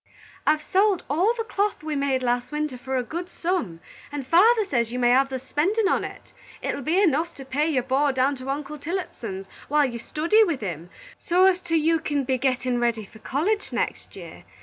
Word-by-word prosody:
"I've 305 0 +3
sold 390 -1 +2
all 375 +11 +2
the 455 - -1
cloth 410 -5 -1
we 310 -1 -3
made 275 -2 0
last 245 +1 0
winter 300 -2 -2
for 260 +1 -3
a 250 - 0
good 345 +8 -5
sum, 330 - -2 0.3
and 290 -2 -4
father 425 - +5
says 235 - 0
you 250 - -3
may 240 -1 +3
hev 270 +2 +4
the 265 - -3
spendin' 360 - 0
on't. - - -3 0.3
It - - -1
will - - -5
be 320 +8 +1
enough 335 -3 +2
to 270 - -10
pay 285 +4 0
your 260 -5 +1
board 270 +2 +1
down 260 +2 +2
to 255 +1 -7
Uncle 290 +1 -4
Tillotson's 245 - -5 0.2
while 295 0 +3
you 240 -3 -4
study 335 - +3
with 330 - -1
him, 175 -4 -5 0.3
so 360 +2 +3
's 375 -1 +3
't 340 -2 -1
you 325 +1 +3
kin 290 -3 -1
be 260 0 0
gettin' 255 -2 0
ready 235 -3 0
for 220 - -16
college 375 - -1
next - - -3
year. - - -10
290 Hz, 210 wpm, -24 LUFS, 255-345 Hz, 0.3 s, father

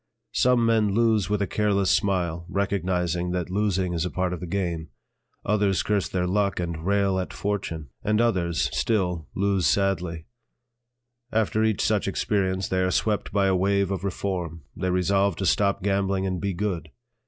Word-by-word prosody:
Some 125 -2 +3
men 110 -3 +2
lose 110 -4 +2
with 105 -1 +1
a - - +1
careless 100 -1 +1
smile, 85 -4 +1
recognizing 90 -3 -1
that 90 -1 -2
losing 95 -3 0
is 85 -2 -1
a 90 - -1
part 90 0 -1
of 90 - -5
the 90 - -6
game; 85 -4 -2 0.6
others 100 -2 +2
curse 105 -2 0
their 90 -1 -1
luck 100 +1 0
and 85 -2 -3
rail 100 0 +2
at 95 - -4
fortune; 85 -8 -3
and 105 +1 +1
others, 90 -8 +1
still, 90 -8 0
lose 100 -2 +1
sadly; 90 -5 0 1.1
after 110 0 +1
each 110 -3 +1
such - - +1
experience 95 -2 0
they 95 - 0
are 90 - +2
swept 105 +2 0
by 100 0 +2
a 95 -1 +3
wave 100 +1 +1
of 95 -2 -3
reform; 90 -5 -3
they 95 - -2
resolve 95 +1 +2
to 95 - -3
stop 100 0 +2
gambling 95 -1 +1
and 95 -2 -2
be 100 -1 -2
good. 90 -4 -2
95 Hz, 170 wpm, -25 LUFS, 90-100 Hz, 1.1 s, Some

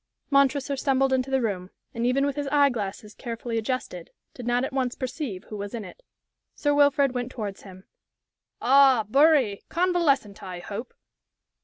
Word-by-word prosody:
Montresor 275 0 +2
stumbled 270 0 +1
into 260 0 0
the 265 -2 +1
room, 185 -4 -3 0.2
and 230 +1 -1
even 275 +3 +2
with 285 -1 -1
his 290 -1 -3
eye 285 -1 +5
glasses 210 -2 -5
carefully 230 -1 -4
adjusted, 220 -7 -4 0.2
did 245 -2 -8
not 245 +1 +1
at 265 - -3
once 255 -2 -1
perceive 255 - -5
who 215 - -8
was 200 +2 -5
in 220 -3 -5
it. - - -13 0.5
Sir 290 -1 +1
Wilfrid 285 -1 +4
went 245 0 -4
towards 205 -6 -6
him. 185 -1 -13 0.8
"Ah, 265 -3 +5
Bury! 270 -5 +4
Convalescent, 330 - +1
I 185 -2 -7
hope?" 205 +7 -7
255 Hz, 165 wpm, -25 LUFS, 215-275 Hz, 0.8 s, eye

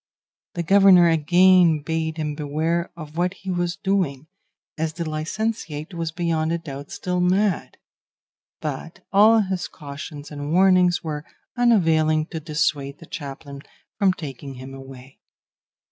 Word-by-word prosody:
The 170 - -2
governor 190 -1 +6
again 175 0 +4
bade 160 0 -2
him 150 -1 -2
beware 160 +4 -1
of 155 -1 -9
what 180 +2 0
he 190 0 -6
was 175 -1 -1
doing, 185 -8 -1 0.5
as 160 0 -2
the 170 0 -4
licentiate 155 0 -3
was 165 -1 -3
beyond 165 -1 -1
a 170 - +1
doubt 145 -4 -8
still 180 -1 -3
mad; 185 +1 +1 0.8
but 160 +5 -6
all 215 +3 +6
his 190 -3 -2
cautions 145 +1 -9
and 145 0 -5
warnings 180 -1 +4
were 150 -2 -4 0.3
unavailing 160 -10 +3
to 160 - -4
dissuade 150 -3 -1
the 165 - -13
chaplain 140 -1 -8 0.4
from 195 -3 +4
taking 135 -4 -8
him 130 +1 -9
away. 135 0 -12
165 Hz, 135 wpm, -23 LUFS, 150-180 Hz, 0.8 s, governor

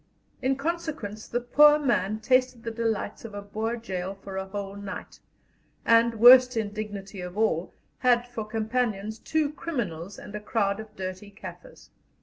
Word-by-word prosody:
In 265 +1 +2
consequence 280 -9 -4
the 240 - -1
poor 295 +5 +6
man 215 -7 0
tasted 255 0 +2
the 230 - -3
delights 225 -2 -2
of 220 -3 -8
a 205 - -4
Boer 220 +3 -2
gaol 195 -4 -4
for 195 0 -9
a 190 0 -3
whole 200 0 -5
night, 200 0 -8 0.7
and, 230 0 +5
worst 250 +2 +8
indignity 205 -2 -4
of 180 +2 -7
all, 190 -6 0 0.2
had 245 -1 +3
for 245 -2 -5
companions 220 -1 -1
two 310 +1 0
criminals 205 - -4
and - - -10
a 210 - -3
crowd 205 -1 0
of 220 -1 -10
dirty 185 +2 -6
Kaffirs. 200 +1 -12
220 Hz, 155 wpm, -27 LUFS, 200-245 Hz, 0.7 s, worst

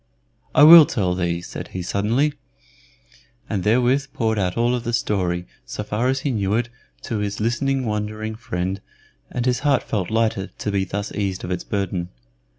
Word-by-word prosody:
"I - - +7
will 160 0 +11
tell 95 -5 0
thee," 85 -1 -1
said - - -7
he, 90 - -6
suddenly, 115 - +1 1.1
and 95 - -2
therewith 125 +6 +2
poured 110 -2 0
out 90 0 -1
all 120 +1 +2
of 125 -2 -2
the 120 0 -3
story, 90 -6 0 0.2
so 105 - -5
far 105 +4 -1
as 135 +1 0
he 140 - -1
knew 100 -3 0
it, 120 +1 0 0.3
to 110 - -3
his 100 -1 -3
listening, 130 +4 0
wondering 110 0 -3
friend, 100 -5 -4 0.5
and 125 -1 -3
his 125 -1 +1
heart 145 -3 +2
felt 95 -5 -2
lighter 110 -4 0
to 105 - -5
be 95 -1 0
thus 100 +3 -4
eased 95 -3 -3
of 90 - -4
its 90 - -2
burden. 95 -3 -2
105 Hz, 180 wpm, -22 LUFS, 95-120 Hz, 1.1 s, will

